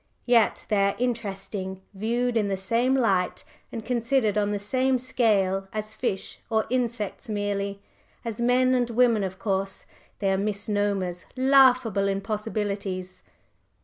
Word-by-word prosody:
Yet 235 Hz, -3 st, +3 dB
they 200 Hz, -2 st, +3 dB
are 200 Hz, -, -1 dB
interesting, 195 Hz, -5 st, -3 dB
viewed 235 Hz, +4 st, -1 dB
in 215 Hz, -3 st, +2 dB
the 195 Hz, -1 st, -1 dB
same 230 Hz, +7 st, +1 dB
light 190 Hz, -7 st, +1 dB, 0.3 s
and 225 Hz, -2 st, -6 dB
considered 235 Hz, -2 st, +1 dB
on 205 Hz, -1 st, +1 dB
the 205 Hz, -, -1 dB
same 255 Hz, +6 st, +1 dB
scale 200 Hz, -6 st, +1 dB
as 215 Hz, 0 st, -4 dB
fish 215 Hz, -4 st, -3 dB
or 220 Hz, -1 st, +1 dB
insects 235 Hz, -2 st, -2 dB
merely. 200 Hz, -1 st, -2 dB, 0.4 s
As 230 Hz, 0 st, -4 dB
men 255 Hz, +1 st, +3 dB
and 245 Hz, -1 st, +1 dB
women 230 Hz, -3 st, +3 dB
of 190 Hz, -1 st, -4 dB
course 195 Hz, -1 st, -2 dB, 0.3 s
they 195 Hz, -1 st, 0 dB
are 190 Hz, -, +1 dB
misnomers, 200 Hz, -3 st, -1 dB
laughable 255 Hz, -6 st, +4 dB
impossibilities. 200 Hz, -2 st, -3 dB
210 Hz, 135 wpm, -26 LUFS, 195-240 Hz, 0.4 s, laughable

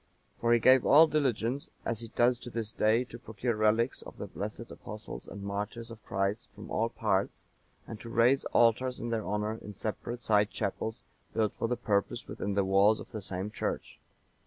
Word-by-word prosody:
For 115 Hz, -, +2 dB
he 120 Hz, -, +7 dB
gave 130 Hz, +2 st, +6 dB
all 155 Hz, +4 st, +8 dB
diligence, 135 Hz, -4 st, 0 dB, 0.2 s
as 115 Hz, -2 st, -1 dB
he 115 Hz, -, -7 dB
does 120 Hz, 0 st, +4 dB
to 120 Hz, -, -8 dB
this 115 Hz, -2 st, -3 dB
day, 110 Hz, +3 st, +3 dB
to 120 Hz, -1 st, -11 dB
procure 115 Hz, +1 st, -2 dB
relics 110 Hz, +3 st, +2 dB
of -, -, -11 dB
the -, -, -5 dB
blessed 105 Hz, +3 st, -6 dB
Apostles 105 Hz, +2 st, -8 dB
and 100 Hz, -, -8 dB
martyrs 105 Hz, +4 st, -4 dB
of 110 Hz, -1 st, -11 dB
Christ 100 Hz, +3 st, -1 dB
from -, -, -10 dB
all 115 Hz, +1 st, +1 dB
parts, 100 Hz, -4 st, -1 dB, 0.4 s
and 110 Hz, -, -8 dB
to 115 Hz, -, -8 dB
raise 120 Hz, +4 st, +4 dB
altars 120 Hz, +2 st, +3 dB
in 120 Hz, 0 st, -3 dB
their 115 Hz, -2 st, 0 dB
honour 105 Hz, +2 st, -1 dB
in 105 Hz, -, -9 dB
separate 120 Hz, +4 st, -4 dB
side 105 Hz, -1 st, +4 dB
chapels 110 Hz, +3 st, -3 dB, 0.3 s
built 110 Hz, -2 st, +1 dB
for -, -, -2 dB
the 125 Hz, +1 st, -1 dB
purpose 100 Hz, -4 st, 0 dB
within 100 Hz, 0 st, -3 dB
the 100 Hz, -1 st, +2 dB
walls 100 Hz, +3 st, +4 dB
of -, -, -10 dB
the 110 Hz, -, -5 dB
same 95 Hz, +1 st, -4 dB
church. -, -, -4 dB
110 Hz, 195 wpm, -30 LUFS, 105-120 Hz, 0.4 s, all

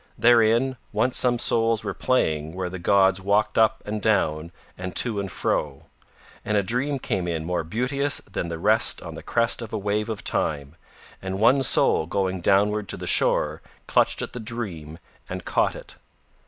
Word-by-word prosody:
Therein 120 Hz, +2 st, +3 dB
once 130 Hz, 0 st, 0 dB
some 120 Hz, -1 st, +2 dB
souls 115 Hz, -1 st, +1 dB
were 100 Hz, -2 st, -3 dB
playing 80 Hz, -11 st, -1 dB
where 90 Hz, -1 st, -4 dB
the 95 Hz, -, -6 dB
gods 95 Hz, +1 st, +3 dB
walked 100 Hz, +3 st, +1 dB
up 110 Hz, -, +2 dB
and 105 Hz, 0 st, -4 dB
down 85 Hz, -7 st, 0 dB, 0.2 s
and 90 Hz, 0 st, -7 dB
to 115 Hz, -5 st, +1 dB
and 100 Hz, -1 st, -4 dB
fro. 70 Hz, -2 st, -2 dB, 0.6 s
And 105 Hz, -, 0 dB
a 100 Hz, -, +2 dB
dream 125 Hz, +7 st, 0 dB
came 90 Hz, -8 st, -3 dB
in 80 Hz, -2 st, -3 dB
more 90 Hz, -1 st, -2 dB
beauteous 130 Hz, -, 0 dB
than 95 Hz, -3 st, -5 dB
the 85 Hz, -1 st, -5 dB
rest -, -, +3 dB
on -, -, -8 dB
the -, -, -9 dB
crest 115 Hz, +1 st, 0 dB
of 115 Hz, -, -7 dB
a -, -, -1 dB
wave 105 Hz, +2 st, -2 dB
of 110 Hz, -3 st, -5 dB
Time, 70 Hz, 0 st, -2 dB, 0.5 s
and 95 Hz, 0 st, -4 dB
one 125 Hz, +5 st, +4 dB
soul 100 Hz, -10 st, +3 dB
going 95 Hz, 0 st, -2 dB
downward 100 Hz, +2 st, +1 dB
to -, -, -2 dB
the -, -, -7 dB
shore -, -, +2 dB, 0.2 s
clutched -, -, +1 dB
at -, -, -7 dB
the 125 Hz, -, -6 dB
dream 100 Hz, -10 st, -5 dB, 0.3 s
and -, -, -6 dB
caught -, -, +1 dB
it. -, -, -11 dB
100 Hz, 180 wpm, -24 LUFS, 90-115 Hz, 0.6 s, one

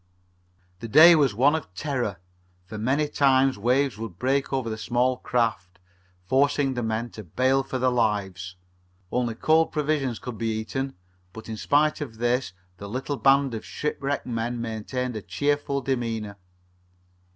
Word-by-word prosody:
The 115 Hz, -, -6 dB
day 160 Hz, +9 st, +9 dB
was 140 Hz, -9 st, +3 dB
one 135 Hz, +6 st, +4 dB
of 160 Hz, -12 st, -3 dB
terror, 125 Hz, -, -2 dB, 0.5 s
for 105 Hz, +3 st, -8 dB
many 135 Hz, +7 st, +1 dB
times 135 Hz, -4 st, +3 dB
waves 125 Hz, +1 st, +1 dB
would 110 Hz, -6 st, -7 dB
break 135 Hz, +5 st, 0 dB
over 130 Hz, -3 st, -1 dB
the 110 Hz, -, -2 dB
small 125 Hz, +3 st, 0 dB
craft, 110 Hz, -8 st, -1 dB, 0.5 s
forcing 140 Hz, +4 st, +2 dB
the 125 Hz, -, -3 dB
men 110 Hz, +1 st, -2 dB
to 110 Hz, -, -9 dB
bail 130 Hz, +9 st, +1 dB
for 135 Hz, -1 st, -4 dB
their 130 Hz, 0 st, +2 dB
lives. 95 Hz, -6 st, -1 dB, 0.6 s
Only 120 Hz, -2 st, -1 dB
cold 160 Hz, +6 st, +3 dB
provisions 145 Hz, -5 st, -1 dB
could 125 Hz, -3 st, -8 dB
be 110 Hz, -1 st, -1 dB
eaten, 135 Hz, +5 st, -4 dB, 0.4 s
but 110 Hz, -, -10 dB
in 110 Hz, -, -5 dB
spite 150 Hz, +7 st, +1 dB
of 120 Hz, -7 st, -6 dB
this 120 Hz, +1 st, 0 dB, 0.3 s
the 100 Hz, -, -8 dB
little 130 Hz, +5 st, -3 dB
band 135 Hz, -1 st, +3 dB
of 110 Hz, -, -5 dB
shipwrecked 145 Hz, -1 st, -3 dB
men 120 Hz, 0 st, -3 dB
maintained 115 Hz, +2 st, -4 dB
a 110 Hz, -, -4 dB
cheerful 140 Hz, +8 st, -1 dB
demeanor. 115 Hz, -6 st, -3 dB
125 Hz, 155 wpm, -25 LUFS, 110-140 Hz, 0.6 s, day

